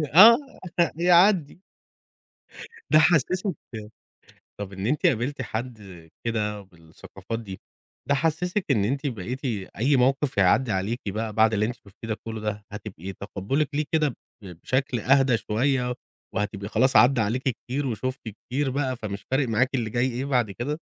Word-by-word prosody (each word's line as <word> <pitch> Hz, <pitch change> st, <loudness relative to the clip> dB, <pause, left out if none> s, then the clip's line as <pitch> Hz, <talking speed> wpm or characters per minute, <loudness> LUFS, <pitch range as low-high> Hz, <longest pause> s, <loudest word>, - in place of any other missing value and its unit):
آه 230 Hz, +7 st, +10 dB, 0.6 s
يعدي. 175 Hz, -1 st, +4 dB, 1.3 s
ده 155 Hz, -, +7 dB
حسسِك 175 Hz, -, +2 dB, 1.1 s
طب 100 Hz, -1 st, -5 dB
إن 95 Hz, +1 st, -4 dB
أنتِ 145 Hz, +4 st, +1 dB
قابلتِ 130 Hz, +3 st, 0 dB
حد 105 Hz, -8 st, -7 dB, 0.2 s
كده 105 Hz, -3 st, -1 dB
بالثقافات 95 Hz, +4 st, -9 dB
دي، 95 Hz, -4 st, -9 dB, 0.5 s
ده 140 Hz, -, +4 dB
حسسِك 165 Hz, +6 st, 0 dB
إن 105 Hz, -6 st, +3 dB
أنتِ 140 Hz, +6 st, -1 dB
بقيتِ 125 Hz, +3 st, -5 dB, 0.3 s
أي 135 Hz, +4 st, +3 dB
موقف 135 Hz, 0 st, +1 dB
يعدي 105 Hz, +5 st, +3 dB
عليكِ 100 Hz, +6 st, -2 dB
بقى 110 Hz, +2 st, -3 dB
بعد 110 Hz, +1 st, +4 dB
اللي 105 Hz, +1 st, +1 dB
أنتِ 120 Hz, -, -4 dB
شُفتيه 105 Hz, +2 st, -13 dB
ده 110 Hz, -, -1 dB
كله 110 Hz, -1 st, -5 dB
دهظن 105 Hz, -1 st, -3 dB
هتبقي 95 Hz, -3 st, -7 dB
تقبلك 105 Hz, +10 st, -2 dB
ليه 150 Hz, +1 st, +1 dB
كده 155 Hz, -2 st, +3 dB
ب 125 Hz, -, -7 dB, 0.3 s
بشكل 125 Hz, -, -2 dB
أهدى 135 Hz, 0 st, +4 dB
شوية 125 Hz, +3 st, 0 dB, 0.4 s
وهتبقى 100 Hz, -1 st, -3 dB
خلاص 130 Hz, +5 st, +2 dB
عدى 125 Hz, -1 st, +6 dB
عليكِ 115 Hz, +5 st, 0 dB
كتير 130 Hz, +3 st, -3 dB
وشفتِ 130 Hz, +1 st, -4 dB
كتير 130 Hz, +6 st, -3 dB
بقى 130 Hz, -1 st, -1 dB
فمش 100 Hz, -3 st, -6 dB
فارق 130 Hz, -1 st, +1 dB
معاكِ 125 Hz, +4 st, +2 dB
اللي 115 Hz, -4 st, -1 dB
جاي 125 Hz, +3 st, +1 dB
إيه 125 Hz, +2 st, -3 dB
بعد 125 Hz, -6 st, +1 dB
كده؟ 140 Hz, +10 st, -4 dB
120 Hz, 150 wpm, -25 LUFS, 105-140 Hz, 1.3 s, آه